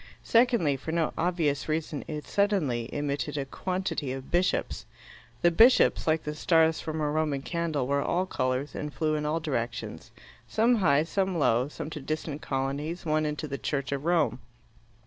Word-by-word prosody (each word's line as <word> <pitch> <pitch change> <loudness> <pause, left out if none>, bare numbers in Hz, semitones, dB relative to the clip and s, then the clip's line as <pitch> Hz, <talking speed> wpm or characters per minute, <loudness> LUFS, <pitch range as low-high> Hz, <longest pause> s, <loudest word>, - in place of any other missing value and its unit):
Secondly, 230 - +3
for 160 - -5
no 165 -1 0
obvious 160 -5 0
reason, 155 -1 -2
it 150 -2 -5
suddenly 165 - 0
emitted 145 +1 -2
a 140 - -1
quantity 180 -2 -3
of 135 0 -7
bishops. 175 -9 0 0.6
The 175 - +6
bishops, 225 +4 +5
like 155 0 +2
the 150 - -3
stars 160 0 +3
from 155 0 -4
a 150 -1 0
Roman 150 -3 0
candle, 165 -5 -1
were 140 +2 +1
all 180 +5 0
colours, 130 -3 -2
and 150 - -4
flew 155 0 -1
in 150 0 -1
all 155 +2 0
directions, 120 -7 -4 0.4
some 230 +2 +3
high, 150 -7 +3
some 190 +2 -1
low, 125 -4 +2
some 155 +1 -7
to 155 -2 -6
distant 155 +1 -4
colonies, 140 +6 -3
one 155 -1 +1
into 150 +1 -3
the 140 -1 -5
Church 140 -2 -2
of 140 +1 -3
Rome. 165 -9 +2
155 Hz, 170 wpm, -28 LUFS, 140-170 Hz, 0.6 s, The